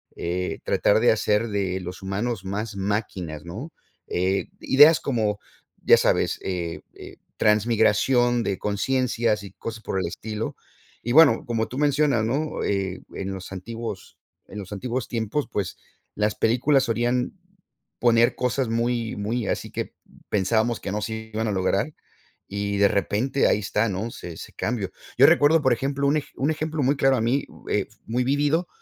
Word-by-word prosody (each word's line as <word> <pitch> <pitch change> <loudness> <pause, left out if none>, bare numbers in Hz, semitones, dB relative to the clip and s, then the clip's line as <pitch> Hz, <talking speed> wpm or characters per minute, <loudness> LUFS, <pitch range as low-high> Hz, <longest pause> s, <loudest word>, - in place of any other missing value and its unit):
eh, 90 +2 -3
tratar 105 - +3
de 120 - +5
hacer 105 +1 +1
de 95 -2 -1
los 90 +1 -7
humanos 100 +2 -2
más 100 +3 -4
máquinas, 95 -6 -3
¿no? 115 - -7 0.4
Eh, 95 +2 0
ideas 150 +4 +7
como, 110 -6 0 0.5
ya - - +7
sabes, - - +1
eh, 85 -3 -3
e - - -11 0.2
transmigración 115 +3 +3
de 100 -4 -1
consciencias 115 0 0
y 100 - -9
cosas 110 -1 -7
por 95 - -2
el 90 - -1
estilo, 110 +5 -5 0.5
y 120 - -2
bueno 145 -4 +6
como 115 -2 -1
tú 130 - -7
mencionas, 145 -5 +2
¿no? 145 +7 -1
Eh, 95 -2 -1
en 95 0 -4
los 95 0 -7
antiguos 110 +1 -7 0.3
en 105 - -10
los 95 0 -9
antiguos 120 +5 -3
tiempos 115 +5 -2
pues 100 -3 -3 0.4
las 105 0 +1
películas 130 +4 +3
solían 120 +2 0 0.7
poner 120 -1 +4
cosas 125 +1 0
muy 115 0 -1
muy 110 +2 -2
así - - -2
que - - -4 0.4
pensábamos 110 +4 +1
que 95 - -4
no 105 +1 -2
se 110 0 -5
iban 110 +1 -1
a 105 - 0
lograr 100 +8 0 0.5
y 100 0 -2
de 100 0 +5
repente 110 +8 +1
ahí - - +3
está, 105 +2 0
¿no? 105 +4 -3
Se 85 - -8
ese - - -10
cambio. 110 -5 -2 0.3
Yo - - +8
recuerdo, 155 +2 +5
por 130 -2 +4
ejemplo, 140 +3 -1
un 150 +1 +2
un 145 +4 0
ejemplo 155 -1 -2
muy 140 +3 +3
claro 135 -1 +3
a 110 - 0
mí, 125 +5 +1 0.2
eh, - - 0 0.2
muy 125 +3 0
vívido, 145 +6 +1
110 Hz, 165 wpm, -24 LUFS, 100-125 Hz, 0.7 s, Yo